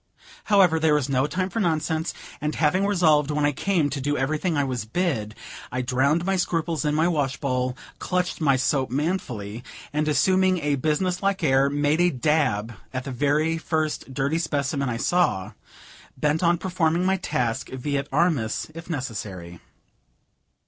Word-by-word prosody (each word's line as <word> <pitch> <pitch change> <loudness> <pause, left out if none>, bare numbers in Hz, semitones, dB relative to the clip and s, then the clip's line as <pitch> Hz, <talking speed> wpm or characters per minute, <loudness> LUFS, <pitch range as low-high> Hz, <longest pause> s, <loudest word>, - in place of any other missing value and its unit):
However, 185 -6 +4
there 155 -1 +3
was 145 -2 0
no 135 +1 +2
time 185 +4 -2
for 225 - -2
nonsense, 160 -3 0 0.3
and, 150 +1 -2
having 185 +6 +2
resolved 155 -7 +3
when 150 0 +1
I 145 - +3
came 165 +2 +1
to 140 0 -3
do 145 +2 0
everything 155 +5 0
I 145 - +2
was 130 -4 -2
bid, 110 - -2 0.4
I 125 0 -2
drowned 140 +7 +1
my 195 0 +1
scruples 165 -2 -1
in 150 -1 0
my 160 +2 +3
wash 145 -5 0
bowl, 125 -2 -1 0.2
clutched 180 -2 -1
my 140 -3 +4
soap 130 0 +1
manfully, 125 - -3 0.3
and, 150 +1 0
assuming 185 +5 +3
a 150 -3 0
business 155 +6 0
like 195 -2 0
air, 135 -1 +4
made 145 +3 +1
a 175 - +4
dab 125 -6 0 0.2
at 130 0 -4
the 145 +5 0
first 155 -4 -2
dirty 140 +4 0
specimen 140 -3 -1
I 115 - -2
saw, 115 - +1 0.7
bent 150 +4 +1
on 170 -1 +3
performing 175 -1 0
my 190 +1 +2
task 125 -8 -2
vi 140 +2 -2
et 140 - -5
armis 155 -7 0
if 165 +2 -10
necessary. 100 - -5
150 Hz, 165 wpm, -24 LUFS, 130-170 Hz, 0.7 s, However